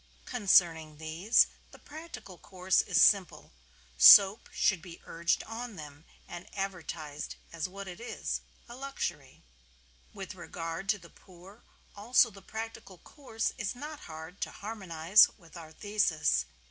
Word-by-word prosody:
Concerning 170 - +2
these, 160 +8 +2 0.2
the - - -15
practical 310 - -11
course 185 -1 0
is - - 0
simple; 195 -4 +3 0.5
soap 195 - +8
should 190 -5 +1
be 170 0 -12
urged 170 0 -1
on 230 0 -7
them 150 -1 -11 0.2
and 175 0 -9
advertised 165 -6 -5 0.2
as 165 +2 -4
what 200 +1 -9
it 180 -1 -9
is 235 - -4 0.3
a 240 - -10
luxury. 175 - -6 0.7
With 195 -2 -8
regard 170 +1 -7
to 210 - +3
the 170 -3 -16
poor 190 +4 -17 0.3
also 235 +3 +3
the 195 -1 -14
practical 220 -4 -8
course 225 - -5
is 210 +2 -3
not 295 +4 -8
hard 160 +4 -10
to - - -2
harmonize 195 -3 +3
with 170 -5 -19
our 160 -2 -10
thesis. 160 - 0
190 Hz, 135 wpm, -30 LUFS, 165-215 Hz, 0.7 s, soap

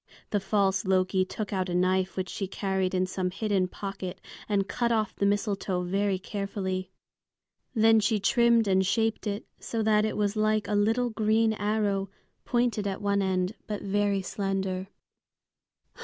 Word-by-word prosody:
The 205 - +2
false 195 0 +1
Loki 185 -1 +2
took 205 +2 -5
out 185 -1 -1
a 175 - -1
knife 185 +1 +1
which 185 0 -1
she 195 - -4
carried 190 -1 -1
in 185 0 +2
some 185 0 -2
hidden 195 -1 0
pocket 195 -1 -6 0.3
and 200 -2 +1
cut 235 +2 0
off 220 -2 0
the 200 - +1
mistletoe 200 -3 0
very 195 +2 0
carefully. 190 -1 -3 0.9
Then 225 0 +5
she 210 0 +1
trimmed 235 +2 +4
and 190 -1 +3
shaped 220 +4 0
it 205 +1 -3
so 225 -1 -2
that 210 -1 +3
it 215 - -1
was 205 0 0
like 215 0 +1
a 210 - -2
little 225 +4 +2
green 220 0 +2
arrow, 205 -2 0 0.4
pointed 240 -4 +1
at 195 -1 -3
one 200 0 +1
end, 185 0 0
but 210 -1 -4
very 200 -1 +1
slender. 195 -1 -2
200 Hz, 160 wpm, -28 LUFS, 190-215 Hz, 0.9 s, Then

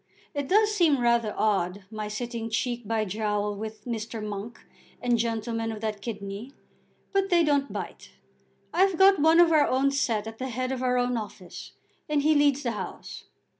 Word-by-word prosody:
It 285 -2 -3
does 425 +4 +4
seem 330 -9 +3
rather 235 -2 +2
odd, 195 -2 0
my 215 -1 -4
sitting 230 +1 -4
cheek 240 0 -2
by 225 -1 0
jowl 210 +1 -1
with 215 +1 -7
Mr. 225 -2 -4
Monk 210 +3 -6 0.4
and 245 -1 +1
gentlemen 225 0 -2
of 220 - -6
that 215 -2 -3
kidney; 205 +3 -6 0.6
but 390 0 +1
they 345 -2 +4
don't 285 -5 +1
bite. 200 - -7 0.6
I've 375 0 +3
got 385 -1 +6
one 320 +3 +5
of 345 -1 +6
our 305 -2 +5
own 270 +2 +2
set 230 -6 0
at 225 0 -8
the 260 0 -3
head 255 +2 -2
of 260 -1 -3
our 250 -1 +1
own 245 0 +1
office, 205 -4 -8 0.4
and 295 -1 +1
he 310 +1 +4
leads 290 -1 +3
the 240 - 0
House. 210 - -7
235 Hz, 180 wpm, -27 LUFS, 215-285 Hz, 0.6 s, got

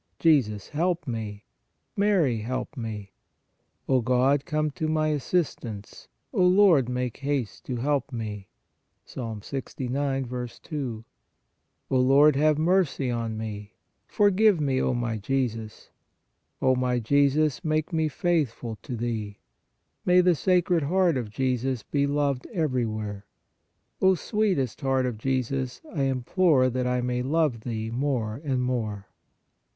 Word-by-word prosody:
Jesus, 120 - +2
help 170 +1 -1
me. 110 -4 -5 0.5
Mary, 190 - +2
help 125 +7 -4
me. 110 -5 -6 0.4
" - - -47
O 130 -2 +3
God, 130 +4 +2
come 155 -2 0
to 155 +2 -3
my 155 0 +1
assistance; 135 - -3 0.3
O 195 -6 +2
Lord, 180 - +5
make 125 -1 -2
haste 140 -6 -3
to 125 - -3
help 140 +2 -1
me 105 -5 -5 0.3
" - - -49
(Ps. - - -15 0.2
69. 130 -1 -3 0.2
2). 125 -8 -5 0.9
O 130 - +3
Lord, 140 +3 +5
have 150 +1 +3
mercy 160 -6 +1
on 115 -2 -3
me. 105 -1 -6 0.3
For 205 -1 +3
give 205 -2 +4
me, 135 -3 +1
O 125 - +1
my 120 -2 -2
Jesus. 115 -2 -3 0.7
O 130 0 +4
my 125 -1 0
Jesus, 140 +6 +2
make 155 +1 -1
me 160 -1 +2
faith 160 -1 +1
ful 115 -1 -7
to 125 - -5
Thee. 110 -3 -3 0.7
May 180 0 +5
the 180 0 +4
Sacred 180 0 +2
Heart 175 +2 +2
of 120 -4 -3
Jesus 130 +1 -1
be 140 -1 0
loved 140 -2 0
everywhere. 110 - -2 0.7
O 190 0 +5
sweetest 185 - -1
Heart 135 -1 +1
of 120 -4 -3
Jesus, 130 +1 -1
I 140 -5 0
implore 135 +1 +2
that 125 0 -1
I 125 0 +1
may 125 0 -1
love 145 -2 +1
Thee 110 -1 -4
more 120 -2 -1
and 130 -4 0
more. 110 -6 -2
130 Hz, 140 wpm, -26 LUFS, 120-155 Hz, 0.9 s, Lord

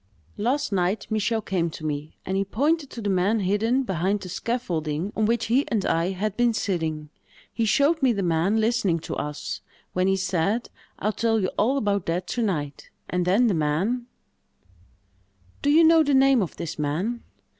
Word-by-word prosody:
"Last 260 +6 0
night, 190 +2 0
Michel 220 +1 0
came 175 -4 0
to 155 - -8
me, 150 0 -4
and 190 - -2
he 195 - +2
pointed 285 - 0
to 230 - -8
the 205 - -1
man 195 +4 +2
hidden 220 +7 +1
behind 195 -1 -1
the 185 - -7
scaffolding 175 -5 -2
on 215 -1 +1
which 230 0 +1
he 250 +5 +3
and 215 -4 -1
I 165 +2 +1
had 195 +2 -2
been 240 -1 +2
sitting. 160 -7 -2 0.4
He 230 - 0
showed 285 +8 +3
me 260 -2 +4
the 200 -4 -1
man 175 +5 +2
listening 220 -6 +1
to - - -5
us, 150 0 -4 0.3
when 185 +1 +1
he 195 - +3
said, 195 +5 -1 0.3
'I'll 215 +1 -1
tell 225 0 +1
you 185 -3 0
all 255 +7 +1
about 200 -6 0
that 175 +2 -1
to 245 - -1
night;' 150 -10 -3 0.2
and 180 -1 0
then 200 +7 +4
the 220 - +3
man——" 180 +11 0 1.5
"Do 285 - +1
you 315 +3 +6
know 325 0 +6
the 285 -3 +2
name 265 -2 +5
of 180 - -3
this 155 - -5
man?" 175 +12 -1
205 Hz, 190 wpm, -25 LUFS, 175-235 Hz, 1.5 s, you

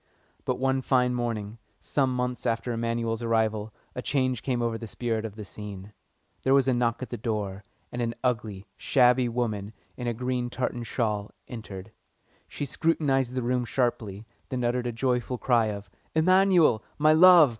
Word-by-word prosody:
But - - 0
one 130 0 +1
fine 125 -1 +2
morning, 115 -3 -3 0.2
some 130 -3 0
months 125 0 -2
after 115 +1 0
Emanuel's 115 0 -1
arrival, 110 -2 0 0.2
a 125 - -4
change 130 -3 0
came 125 -3 -1
over 115 -1 0
the 115 0 -6
spirit 115 0 -2
of 105 -2 -6
the 105 -1 -7
scene. 100 0 -8 0.5
There 135 +1 +4
was 135 -1 +4
a 130 - +4
knock 120 0 0
at - - -8
the 120 - -4
door, 105 -3 -3 0.3
and 120 - -3
an 115 0 -1
ugly, 110 -6 -1
shabby 125 -2 +4
woman, 110 -3 -2 0.2
in 125 - -5
a 120 - -1
green 125 0 -1
tartan 120 -1 -3
shawl, 105 -3 -1 0.2
entered. 105 -4 -8 0.6
She 145 - -4
scrutinised 135 -4 +1
the 130 - -1
room 125 +1 +1
sharply, 115 -4 -1 0.2
then 130 -3 -2
uttered 120 +1 0
a - - -1
joyful 125 +1 0
cry 120 -3 +3
of 100 -1 -5 0.3
"Emanuel, 180 - +5
my 155 +1 +5
love!" 170 -2 +8
120 Hz, 170 wpm, -27 LUFS, 110-130 Hz, 0.6 s, love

